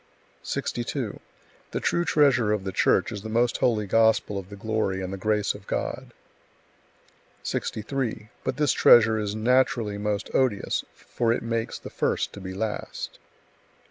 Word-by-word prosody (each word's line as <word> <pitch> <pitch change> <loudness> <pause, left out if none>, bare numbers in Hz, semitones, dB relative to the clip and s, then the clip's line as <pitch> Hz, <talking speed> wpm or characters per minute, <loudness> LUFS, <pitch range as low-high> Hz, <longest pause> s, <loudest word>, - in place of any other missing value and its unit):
62. 120 -1 -3 0.5
The - - -2
true 170 - +1
treasure 130 -10 +3
of 105 -2 0
the 95 - -3
Church - - +2
is 105 -3 -5
the 110 - -7
Most 120 +2 +2
Holy 110 -4 +1
Gospel 110 -1 +3
of 95 -1 -10
the 100 - -8
glory 110 -2 -1
and 95 0 -4
the - - -2
grace 105 +1 0
of 100 -1 -13
God. - - -3 1.3
63. 110 -1 -3
But - - -2
this 150 -2 +3
treasure 110 -2 +6
is 105 -1 -2
naturally 120 -2 +2
most 105 0 -2
odious, 125 -7 +1
for 115 -1 -1
it 115 - 0
makes 115 0 -2
the - - -10
first - - -1
to 100 - -9
be 95 0 -6
last. 105 +1 -4
110 Hz, 155 wpm, -26 LUFS, 100-120 Hz, 1.3 s, treasure